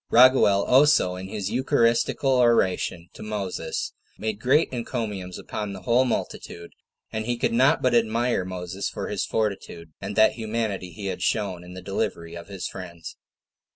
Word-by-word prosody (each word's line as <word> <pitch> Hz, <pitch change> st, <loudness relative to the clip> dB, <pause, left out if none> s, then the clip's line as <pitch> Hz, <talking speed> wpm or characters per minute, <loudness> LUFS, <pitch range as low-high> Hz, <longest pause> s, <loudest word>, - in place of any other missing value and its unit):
Raguel 120 Hz, -5 st, +6 dB
also, 130 Hz, -9 st, +5 dB
in 95 Hz, +1 st, -7 dB
his 100 Hz, 0 st, -4 dB
eucharistical 125 Hz, +1 st, +2 dB
oration 95 Hz, -7 st, +2 dB
to -, -, -12 dB
Moses, 100 Hz, -6 st, -3 dB, 0.2 s
made 110 Hz, -1 st, -3 dB
great 135 Hz, +6 st, +2 dB
encomiums 105 Hz, -7 st, -4 dB
upon 105 Hz, -2 st, -5 dB
the 95 Hz, -1 st, -9 dB
whole 125 Hz, +2 st, +3 dB
multitude; 85 Hz, -7 st, -4 dB, 0.4 s
and 110 Hz, 0 st, -3 dB
he 120 Hz, -1 st, 0 dB
could 115 Hz, -, 0 dB
not 130 Hz, +4 st, +4 dB
but 125 Hz, -1 st, +3 dB
admire 115 Hz, -1 st, +2 dB
Moses 90 Hz, +1 st, -4 dB
for -, -, -5 dB
his -, -, -2 dB
fortitude, 100 Hz, -6 st, -3 dB
and 100 Hz, +1 st, -5 dB
that 110 Hz, 0 st, +6 dB
humanity 110 Hz, -4 st, -3 dB
he 100 Hz, +4 st, -8 dB
had 95 Hz, -2 st, -3 dB
shewn 95 Hz, -6 st, -1 dB
in 90 Hz, +1 st, -11 dB
the 90 Hz, -, -8 dB
delivery 95 Hz, -4 st, -3 dB
of 85 Hz, +1 st, -9 dB
his 100 Hz, -2 st, -5 dB
friends. 85 Hz, -4 st, -8 dB
105 Hz, 160 wpm, -25 LUFS, 95-115 Hz, 0.4 s, Raguel